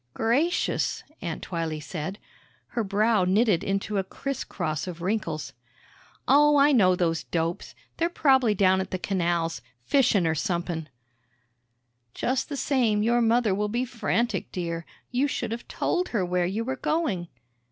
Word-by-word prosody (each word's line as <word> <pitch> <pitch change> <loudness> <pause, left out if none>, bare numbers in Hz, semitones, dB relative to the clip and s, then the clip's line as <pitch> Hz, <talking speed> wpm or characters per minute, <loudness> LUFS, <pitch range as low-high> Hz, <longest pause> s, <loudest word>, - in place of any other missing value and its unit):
"Gracious," 275 +10 +1 0.2
Aunt 165 -4 -4
Twylee 165 -3 -3
said; 160 +4 -5 0.5
her 235 - -1
brow 210 0 +2
knitted 195 0 +3
into 195 +1 -1
a - - 0
criss 275 +7 -4
cross 155 -3 -3
of 175 -2 -6
wrinkles. 175 -7 -2 0.7
"Oh, 295 +2 +6
I 285 +1 +6
know 190 -9 +5
those 165 -3 0
dopes. 165 0 -3 0.2
They're 335 +1 +1
prob'ly 265 -9 +3
down 190 -1 +4
at 190 - -5
th' 185 - -5
canals 170 -6 0 0.2
fishin' 225 -10 +3
or 160 - +2
somep'n." 170 -2 -2 1.3
"Just 260 +1 -1
the 285 - -4
same, 235 -7 +1
your 240 +2 +3
mother 230 -2 +3
will 210 +2 -1
be 240 +4 -1
frantic, 235 -1 -1
dear. 170 -2 -4 0.2
You 255 +3 +2
should 240 -5 -3
have 230 +1 -5
told 365 0 -1
her 205 -6 0
where 180 0 0
you 210 +5 -2
were 265 +3 -3
going." 255 - -1
205 Hz, 150 wpm, -26 LUFS, 175-245 Hz, 1.3 s, Oh